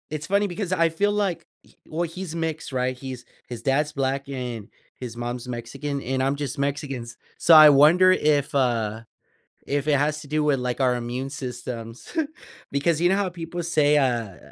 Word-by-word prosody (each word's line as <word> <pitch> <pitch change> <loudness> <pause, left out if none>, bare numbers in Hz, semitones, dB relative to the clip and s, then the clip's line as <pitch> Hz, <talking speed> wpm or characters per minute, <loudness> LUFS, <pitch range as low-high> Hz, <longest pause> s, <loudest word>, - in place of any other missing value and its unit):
it's 155 0 -4
funny 200 +1 +2
because 180 +1 -4
I 165 -3 +3
feel 200 +6 +1
like 190 -5 -1 0.4
well, 165 +2 -2
he's 170 0 -6
mixed, 160 -3 -3
right, 130 0 -1
he's 130 -1 -8 0.2
his 120 -2 -7
dad's 145 +4 +1
black, 135 0 -2
and 125 -5 -5 0.3
his 120 -2 -7
mom's 120 +1 -5
Mexican, 135 +4 -4
and 130 +1 -1
I'm 135 +2 +1
just 140 -1 -4
Mexican, 140 -2 -2
s 115 0 -11 0.2
so 170 - +6
I 155 -1 +10
wonder 165 +7 +6
if 150 -6 +1
uh, 115 -5 0 0.6
if 145 0 -1
it 145 -2 +4
has 150 +1 0
to 145 - -12
do 155 0 0
with, 140 -4 +2
like, 125 +1 -3
our 130 -2 +3
immune 125 +3 -4
systems, 120 -3 -7 0.6
because 150 +3 +1
you 175 - +4
know 190 - +3
how 200 -1 0
people 175 0 -6
say, 150 -3 +3
uh, 120 -8 0
140 Hz, 185 wpm, -24 LUFS, 125-160 Hz, 0.6 s, I